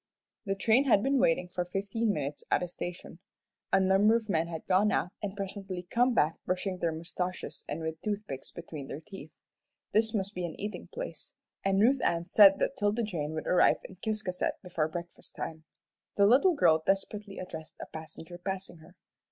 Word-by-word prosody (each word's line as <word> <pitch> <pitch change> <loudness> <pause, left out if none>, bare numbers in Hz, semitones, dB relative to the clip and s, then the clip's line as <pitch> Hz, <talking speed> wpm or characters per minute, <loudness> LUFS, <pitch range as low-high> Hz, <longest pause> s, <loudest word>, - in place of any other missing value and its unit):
The 195 - +1
train 225 +7 +3
had 215 -6 +4
been 275 0 +2
waiting 245 -8 +3
for 180 0 -2
fifteen 200 +5 -1
minutes 145 -4 -3
at - - +2
a - - -2
station. 175 -1 -7 0.5
A 195 - +5
number 195 +4 +5
of 225 -2 -2
men 165 -3 +1
had 165 -2 -6
gone 195 +3 +3
out, 180 - 0
and 200 -1 -4
presently 195 -2 -4
come 245 +1 +3
back 155 -3 +2
brushing 185 0 -2
their 170 - +1
moustaches 180 +3 -4
and 155 +3 -3
with 160 0 -4
toothpicks 205 -11 -4
between 155 -5 -8
their 140 - -6
teeth. 195 +4 -11 0.6
This 220 +1 +2
must 200 0 -1
be 180 - -4
an 170 -2 -5
eating 210 +1 -5
place; - - -7 0.3
and 195 0 +2
Ruth 255 +6 +4
Ann 170 0 +1
said 195 +1 +7
that 270 - -1
'Tilda 210 0 +1
Jane 160 -8 -3
would 160 - -4
arrive 180 - +5
in 185 - -11
Ciscasset 210 -3 -1
before 170 -4 -1
breakfast 170 +1 -8
time. 160 0 -6 0.5
The 200 - +6
little 275 - +5
girl 160 - +4
desperately 195 +1 -1
addressed 160 -4 -8
a - - -5
passenger 160 +2 -9
passing 190 -1 -4
her. 160 +3 -17
190 Hz, 185 wpm, -30 LUFS, 170-210 Hz, 0.6 s, said